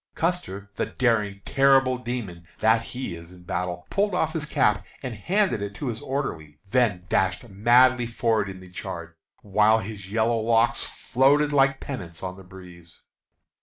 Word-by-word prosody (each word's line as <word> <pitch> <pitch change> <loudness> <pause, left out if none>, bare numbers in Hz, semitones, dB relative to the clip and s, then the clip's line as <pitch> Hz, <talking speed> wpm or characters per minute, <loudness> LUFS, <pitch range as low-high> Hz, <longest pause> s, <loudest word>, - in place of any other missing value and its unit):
Custer, 130 - -2
the - - -1
daring, 105 -6 0
terrible 135 -2 +4
demon 110 -9 -5
that 110 +1 +3
he 125 -3 -6
is 85 +1 -10
in 90 -1 -15
battle, 90 0 -3
pulled 200 -1 +1
off 160 -3 0
his 150 -2 -3
cap 105 -9 +2 0.2
and 130 -3 -4
handed 175 - 0
it 100 0 -5
to 135 - -3
his 110 -1 -5
orderly, 80 - -4
then 110 -8 +2
dashed 95 +7 0
madly 120 +4 +4
forward 115 -3 0
in 95 -1 -9
the 90 -1 -14
charge, 85 -2 -6 0.3
while 105 +2 +4
his 100 -2 -7
yellow 115 +1 +1
locks 115 +1 +2
floated 145 +3 +2
like 135 -1 +3
pennants 90 -12 -7
on 95 0 -4
the 95 - -13
breeze. 90 -3 -14
110 Hz, 165 wpm, -25 LUFS, 95-130 Hz, 0.3 s, terrible